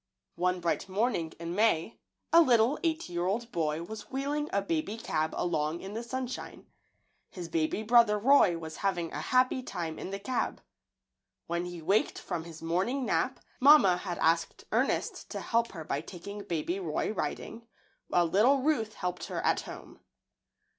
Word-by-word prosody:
One 180 +1 +1
bright 170 +2 -1
morning 195 -5 0
in 170 0 -4
May, 210 -2 +1 0.3
a 335 - +9
little 245 -1 +4
eight 325 -1 0
year 175 0 -2
old 230 +5 -2
boy 160 -1 -1
was 215 +5 -8
wheeling 285 +3 -2
a 200 - +2
baby 195 +4 -2
cab 160 -7 -1
along 160 -1 0
in 195 +1 -7
the 225 - -3
sunshine. 255 +1 -5 0.6
His 175 -3 -7
baby 160 +6 0
brother 225 -1 +5
Roy 210 -6 +5
was 160 -1 -7
having 175 -4 -1
a - - -3
happy 255 0 +2
time 170 -9 -5
in - - -5
the 195 - -3
cab. 245 +6 -2 0.9
When 170 +1 -2
he 175 -2 -7
waked 200 +6 +2
from 170 -3 -4
his 165 -1 -10
morning 195 +11 0
nap - - 0 0.2
mamma 260 -10 +7
had 180 -1 -4
asked 165 +1 +1
Ernest - - 0
to - - -4
help 230 0 0
her 165 -4 -6
by 145 -1 -2
taking 200 +5 -8
baby 175 +1 -2
Roy 165 +1 -1
riding, 230 +1 -4 0.4
while 175 -1 +3
little 215 +11 +4
Ruth 225 -8 0
helped 180 -1 -3
her - - -4
at - - +2
home. - - -10
195 Hz, 165 wpm, -30 LUFS, 170-235 Hz, 0.9 s, a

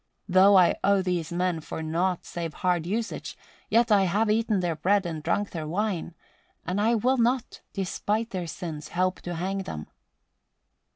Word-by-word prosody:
Though 190 +1 +6
I 180 -2 +5
owe 200 -1 +3
these 175 -3 -2
men 175 -1 0
for 160 +1 -6
nought 175 +3 -1
save 165 -2 -5
hard 175 -3 0
usage, 220 +4 -3 0.3
yet 230 +1 +3
have 205 +1 +3
I - - +4
eaten 220 -2 +1
their 175 -3 -1
bread 195 +5 +2
and 160 -3 -4
drunk 205 +6 -1
their 160 -3 -5
wine, 180 -1 -2 0.5
and 185 +4 -1
I 230 +3 +3
will 255 +4 +2
not, 245 +1 0
despite 210 +4 -2
their 180 -3 -3
sins, 160 -3 -6
help 185 +1 -1
to 175 -1 -5
hang 190 +4 -2
them." 80 - -5
185 Hz, 170 wpm, -26 LUFS, 170-205 Hz, 0.5 s, Though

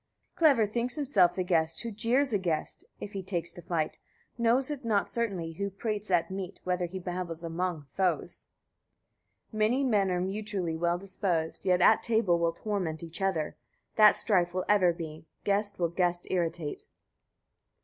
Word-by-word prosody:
31. - - -44 0.2
Clever 215 -2 +1
thinks 240 +1 0
himself 205 - +3
the 185 - 0
guest 165 -1 0
who 230 - -4
jeers 235 +5 +1
a 205 - +3
guest, 170 -4 -2 0.2
if 205 - -7
he 195 - -3
takes 175 -2 -1
to 175 - -9
flight. 165 -2 -2 0.4
Knows 240 +4 +2
it 285 -3 -5
not 215 -3 +1
certainly 195 -8 -2
he 165 - -10
who 200 - 0
prates 210 +1 -3
at 175 -1 +2
meat, 190 -1 -5
whether 180 -1 0
he 185 +2 -7
babbles 175 -2 -5
among 165 -2 -2
foes. 185 -2 -1 1.0
32. 215 - -7
Many 240 +6 +3
men 210 -7 +2
are 180 -1 0
mutually 190 -2 -2
well 170 +1 +1
disposed, 180 -4 -2
yet 180 -1 +3
at 220 - +6
table 220 -7 +2
will 170 0 +1
torment 180 -5 -3
each 165 +4 -5
other. 180 -6 0 0.4
That 215 -1 +7
strife 180 -5 +1
will 185 - -1
ever 195 -4 +5
be; 160 -2 -8 0.2
guest 205 0 0
will 170 -2 +1
guest 175 0 0
irritate. 170 -4 -2
185 Hz, 175 wpm, -29 LUFS, 170-210 Hz, 1.0 s, That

